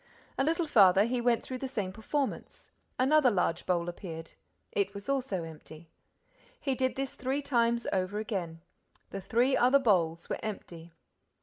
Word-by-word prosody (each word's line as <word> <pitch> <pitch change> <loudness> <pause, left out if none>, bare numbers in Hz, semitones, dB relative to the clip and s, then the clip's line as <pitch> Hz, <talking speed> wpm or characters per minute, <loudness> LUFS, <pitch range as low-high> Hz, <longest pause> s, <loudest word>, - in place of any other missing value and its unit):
A - - +1
little 330 +3 +1
farther, 200 -9 +6
he 245 +1 -1
went 235 -1 +2
through 255 -1 -6
the 265 - -3
same 205 -8 -3
performance. 270 +7 -4 0.3
Another 270 +1 +4
large 180 -5 0
bowl 175 -2 +1
appeared. 165 -2 -7 0.4
It 200 0 -1
was 200 0 -8
also 260 -10 -1
empty. 160 0 -11 0.7
He 275 - -1
did 260 0 0
this 270 -1 -3
three 270 +3 -2
times 235 -3 +1
over 190 +1 -1
again. 185 -7 -4 0.5
The 195 - -5
three 245 +7 +2
other 255 +2 +5
bowls 175 -10 +1
were - - -3
empty. 170 -6 -7
220 Hz, 160 wpm, -30 LUFS, 180-260 Hz, 0.7 s, farther